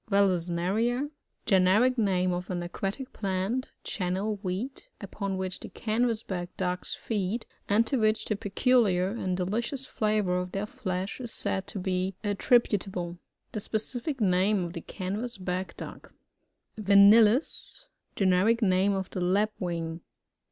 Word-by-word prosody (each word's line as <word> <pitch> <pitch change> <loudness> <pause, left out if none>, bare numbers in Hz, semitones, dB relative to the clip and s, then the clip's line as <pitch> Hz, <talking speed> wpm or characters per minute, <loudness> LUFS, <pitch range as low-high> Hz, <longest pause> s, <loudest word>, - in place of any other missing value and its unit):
Valesneria. 200 - +1 0.2
— - - -48
Generic 200 +6 +4
name 185 -5 +2
of 180 0 -4
an 175 -2 -2
aquatic 195 +9 -4
plant, 195 +5 -1
Channel 195 +2 -2
Weed, 205 +8 -4
upoil 200 -1 -4
which 185 0 -3
the - - -8
Canvass 225 0 0
back 175 -2 -4
ducks 180 -1 -2
feed, 215 +1 -2 0.2
and 215 +3 +4
to 270 - 0
which 215 0 +2
the 215 - 0
peculiar 205 -3 +2
and 190 -4 -2
delicious 235 +8 -2
flavour 210 -7 +1
of 180 0 -5
their 195 +1 -1
flesh, 185 0 -4
is 240 -2 -5
said 190 0 -2
to - - -5
be 185 0 -1
attributable. 200 -5 +1 0.3
The 215 - -3
spe. 220 - -6
ciflc 245 +6 -2
name 190 0 +3
of 170 - -6
the 170 - -5
Canvass 210 +8 -4
back 185 -1 -3
duck. - - -9 0.7
Vanellus. 215 - +5
— - - -46
Generic 200 +5 +3
name 190 0 +3
of 190 -1 -3
the 185 - -3
Lapwing. 180 -4 -1
195 Hz, 145 wpm, -28 LUFS, 185-220 Hz, 0.7 s, Vanellus